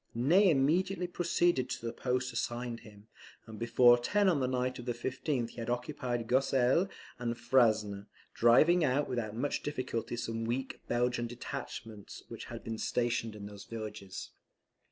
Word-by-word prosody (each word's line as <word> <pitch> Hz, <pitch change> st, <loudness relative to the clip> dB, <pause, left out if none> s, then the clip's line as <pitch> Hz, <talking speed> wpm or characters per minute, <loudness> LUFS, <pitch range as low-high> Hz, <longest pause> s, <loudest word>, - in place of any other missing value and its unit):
Ney 175 Hz, -, +5 dB
immediately 180 Hz, +6 st, +2 dB
proceeded 175 Hz, -5 st, +1 dB
to -, -, -4 dB
the 115 Hz, -, -3 dB
post 125 Hz, 0 st, -1 dB
assigned 120 Hz, 0 st, -3 dB
him; 105 Hz, -2 st, -15 dB, 0.4 s
and 110 Hz, -2 st, -10 dB
before 120 Hz, +1 st, +5 dB
ten 205 Hz, +11 st, +2 dB
on 165 Hz, -6 st, +2 dB
the 130 Hz, -, +1 dB
night 125 Hz, 0 st, -1 dB
of 120 Hz, -, -8 dB
the 120 Hz, -, -1 dB
15th 130 Hz, 0 st, -2 dB
he -, -, -18 dB
had 115 Hz, 0 st, -4 dB
occupied 125 Hz, -1 st, -2 dB
Gosselies 130 Hz, -, +3 dB, 0.3 s
and 120 Hz, -1 st, -2 dB
Frasne, 110 Hz, -5 st, +2 dB, 0.3 s
driving 155 Hz, +9 st, +5 dB
out 140 Hz, +1 st, +2 dB
without 115 Hz, -4 st, -3 dB
much 140 Hz, +5 st, -1 dB
difficulty 125 Hz, -5 st, -3 dB
some 115 Hz, -1 st, -3 dB
weak 125 Hz, +3 st, -3 dB
Belgian 120 Hz, 0 st, 0 dB
detachments 110 Hz, -3 st, -7 dB
which -, -, -7 dB
had -, -, -8 dB
been 115 Hz, -1 st, -5 dB
stationed 120 Hz, -2 st, -1 dB
in 100 Hz, -1 st, -8 dB
those 100 Hz, -1 st, -10 dB
villages. 110 Hz, -4 st, -7 dB
120 Hz, 155 wpm, -32 LUFS, 115-135 Hz, 0.4 s, Ney